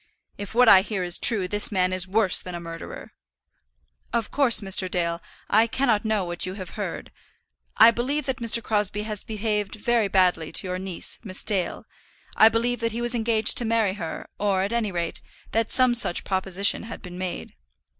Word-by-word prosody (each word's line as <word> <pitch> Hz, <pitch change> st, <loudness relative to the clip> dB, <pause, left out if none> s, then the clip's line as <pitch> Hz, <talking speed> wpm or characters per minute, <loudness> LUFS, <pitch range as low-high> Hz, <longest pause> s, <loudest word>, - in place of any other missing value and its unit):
"If 205 Hz, +2 st, -8 dB
what 250 Hz, 0 st, +5 dB
I 190 Hz, -3 st, +8 dB
hear 195 Hz, -2 st, -4 dB
is 175 Hz, -1 st, -2 dB
true, 205 Hz, -6 st, +4 dB
this 205 Hz, +3 st, +3 dB
man 185 Hz, -2 st, 0 dB
is 185 Hz, 0 st, -1 dB
worse 200 Hz, -1 st, +3 dB
than 180 Hz, -1 st, -8 dB
a -, -, -5 dB
murderer." 165 Hz, -1 st, -9 dB, 1.0 s
"Of 230 Hz, -2 st, -2 dB
course, 275 Hz, -5 st, +3 dB
Mr. 195 Hz, -2 st, +2 dB
Dale, 170 Hz, -1 st, -2 dB, 0.3 s
I 220 Hz, +3 st, +3 dB
cannot 230 Hz, -3 st, 0 dB
know 215 Hz, -3 st, -1 dB
what 175 Hz, 0 st, -4 dB
you 185 Hz, +1 st, -3 dB
have 185 Hz, -3 st, -8 dB
heard. -, -, -6 dB, 0.7 s
I 225 Hz, +1 st, +8 dB
believe 265 Hz, +5 st, -3 dB
that 265 Hz, -2 st, -3 dB
Mr. 230 Hz, 0 st, +2 dB
Crosbie 210 Hz, -1 st, -1 dB
has 215 Hz, -2 st, -4 dB
behaved 210 Hz, -2 st, -3 dB
very 225 Hz, 0 st, 0 dB
badly 180 Hz, -4 st, +1 dB
to -, -, -3 dB
your 185 Hz, 0 st, -4 dB
niece, 190 Hz, -2 st, -6 dB
Miss 185 Hz, -4 st, -5 dB
Dale; 190 Hz, -4 st, -2 dB, 0.5 s
I 220 Hz, -, +7 dB
believe 235 Hz, +2 st, -1 dB
that 230 Hz, -1 st, -2 dB
he 235 Hz, -, -4 dB
was 240 Hz, +1 st, +2 dB
engaged 225 Hz, -2 st, +3 dB
to -, -, -2 dB
marry 220 Hz, -4 st, +1 dB
her, 165 Hz, -5 st, -7 dB
or, 195 Hz, -2 st, 0 dB
at 200 Hz, +4 st, -3 dB
any 225 Hz, -4 st, -1 dB
rate, 170 Hz, -2 st, -3 dB, 0.3 s
that 225 Hz, 0 st, 0 dB
some 255 Hz, -1 st, +3 dB
such 230 Hz, -7 st, +2 dB
proposition 190 Hz, +1 st, +1 dB
had 225 Hz, 0 st, -10 dB
been 180 Hz, -1 st, -9 dB
made." 185 Hz, -1 st, -5 dB
205 Hz, 195 wpm, -24 LUFS, 185-230 Hz, 1.0 s, I